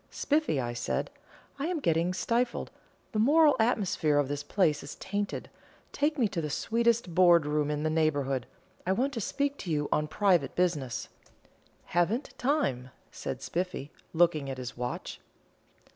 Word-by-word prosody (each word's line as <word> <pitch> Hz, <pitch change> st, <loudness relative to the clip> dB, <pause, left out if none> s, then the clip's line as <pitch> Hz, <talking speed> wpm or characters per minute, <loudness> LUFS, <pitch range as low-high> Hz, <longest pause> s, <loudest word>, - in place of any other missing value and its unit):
"Spiffy," 300 Hz, -, 0 dB
I 120 Hz, -2 st, -2 dB
said, 120 Hz, -, -2 dB, 0.5 s
"I 285 Hz, -, -1 dB
am 350 Hz, -2 st, -1 dB
getting 170 Hz, -, +1 dB
stifled 235 Hz, +6 st, -1 dB, 0.4 s
the 215 Hz, -, -1 dB
moral 295 Hz, +6 st, +5 dB
atmosphere 195 Hz, -10 st, +2 dB
of 145 Hz, -2 st, +2 dB
this 145 Hz, 0 st, -2 dB
place 155 Hz, -1 st, +1 dB
is 145 Hz, -, -8 dB
tainted; 205 Hz, +1 st, -3 dB, 0.4 s
take 295 Hz, +2 st, 0 dB
me 240 Hz, -5 st, +3 dB
to 170 Hz, -, -2 dB
the 150 Hz, -, -3 dB
sweetest 230 Hz, +2 st, +1 dB
board 175 Hz, -3 st, +6 dB
room 150 Hz, 0 st, 0 dB
in 150 Hz, 0 st, -1 dB
the 155 Hz, -, +1 dB
neighbourhood 145 Hz, -5 st, 0 dB, 0.4 s
I 190 Hz, -, +3 dB
want 265 Hz, +7 st, 0 dB
to 230 Hz, -, -3 dB
speak 285 Hz, +7 st, -1 dB
to 175 Hz, -, -4 dB
you 150 Hz, -1 st, 0 dB
on 150 Hz, 0 st, +1 dB
private 175 Hz, -4 st, +2 dB
business." 150 Hz, -9 st, -1 dB, 0.8 s
"Haven't 180 Hz, -, 0 dB
time," 245 Hz, -, 0 dB, 0.2 s
said -, -, -5 dB
Spiffy, 175 Hz, -5 st, -3 dB, 0.2 s
looking 160 Hz, -4 st, +2 dB
at 135 Hz, -, -4 dB
his 125 Hz, -1 st, -6 dB
watch. 125 Hz, 0 st, -5 dB
175 Hz, 160 wpm, -29 LUFS, 145-230 Hz, 0.8 s, board